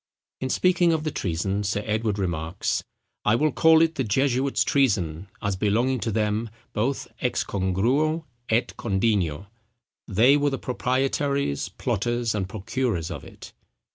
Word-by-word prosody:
In 130 - -3
speaking 175 +2 +3
of 155 -1 -1
the 155 - -1
treason, 95 0 -1
Sir 100 +1 -1
Edward 110 -1 0
remarks, 85 -2 -2 0.4
"I 105 - +4
will 150 +5 +2
call 160 0 +5
it 165 0 +1
the 135 - -1
jesuits' 130 +4 +1
treason, 95 - +1 0.2
as 100 -2 0
belonging 115 +7 +1
to 110 +2 -2
them, 105 +1 0 0.2
both 130 +6 -1
ex - - 0
congruo 125 - 0 0.2
et 115 +2 +1
condigno: 95 -5 0 0.6
they 120 +8 +5
were 145 0 +2
the 135 - -2
proprietaries, 130 - -1
plotters, 120 +2 -1
and 95 -3 -2
procurers 110 -4 -2
of 75 -6 -6
it." - - -12
115 Hz, 140 wpm, -25 LUFS, 95-135 Hz, 0.6 s, call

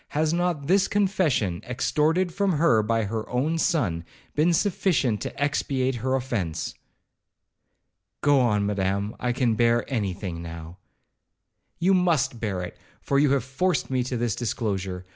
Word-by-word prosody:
Has 155 +1 +2
not 175 -4 0
this 190 +5 +3
confession, 180 - +1
extorted 160 +8 0
from 200 -1 +1
her 150 -8 +4
by 115 +1 0
her 110 +1 -4
own 150 +7 0
son, 115 - 0 0.3
been 155 +3 +3
sufficient 165 - +1
to - - -6
expiate 135 -2 0
her 130 +3 0
offence?' 120 -11 -2 1.5
'Go 145 -1 +4
on, 105 -5 +2
Madam, 100 +1 -1
I 125 - 0
can 120 -2 +1
bear 120 +1 +2
any 100 -6 0
thing 90 -3 -6
now.' 85 +1 -8 1.0
'You 185 +3 +3
must 160 -9 +2
bear 100 -5 -2
it, 90 - -8 0.2
for 140 - +1
you 145 0 +4
have 135 -4 +1
forced 135 +6 -1
me 130 -1 +1
to 125 -1 -3
this 115 -3 -1
disclosure. 95 -6 -3
125 Hz, 150 wpm, -25 LUFS, 105-155 Hz, 1.5 s, her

